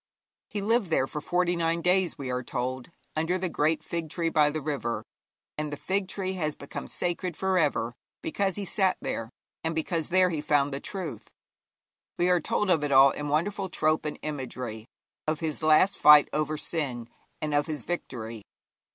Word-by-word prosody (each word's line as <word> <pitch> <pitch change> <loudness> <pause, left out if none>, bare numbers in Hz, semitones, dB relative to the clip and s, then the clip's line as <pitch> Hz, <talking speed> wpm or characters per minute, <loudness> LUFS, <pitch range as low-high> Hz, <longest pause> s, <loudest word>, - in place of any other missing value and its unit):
He 205 - -3
lived 220 -1 +2
there 145 -5 +2
for 150 +2 -5
forty 175 +2 +1
nine 165 0 0
days, 180 -1 +2
we 135 -3 -4
are 125 0 -1
told, 125 +2 -3 0.3
under 165 +4 +1
the 185 -1 -2
great 155 0 +1
fig 165 -1 -4
tree 165 +1 -1
by 150 -2 +4
the 155 +1 -2
river. 120 -7 -2 0.6
And 150 -1 -2
the 145 - -4
fig 190 +3 -1
tree 190 0 -3
has 155 -5 -2
become 140 - -7
sacred 175 -1 -2
for 190 0 +1
ever 130 -7 +1 0.3
because 195 +3 0
he 205 - -3
sat 190 0 +1
there 115 0 -3 0.3
and 165 0 -1
because 160 0 -1
there 185 0 +4
he 155 -3 -2
found 145 -2 +2
the 135 - -2
truth. 185 -3 -5 0.9
We 175 +1 +3
are 180 -2 +3
told 205 +5 +1
of 160 -4 +3
it 145 - -1
all 135 0 +8
in 150 0 -4
wonderful 190 +6 0
trope 155 -3 +1
and 150 - -3
imagery 125 -6 -5 0.4
of 155 -1 0
his 155 -2 -3
last 155 +5 +4
fight 150 -1 +8
over 155 0 0
sin, 135 -8 -3 0.3
and 150 -1 -2
of 145 0 +2
his 155 -2 -4
victory. 115 -10 -5
155 Hz, 185 wpm, -28 LUFS, 145-180 Hz, 0.9 s, all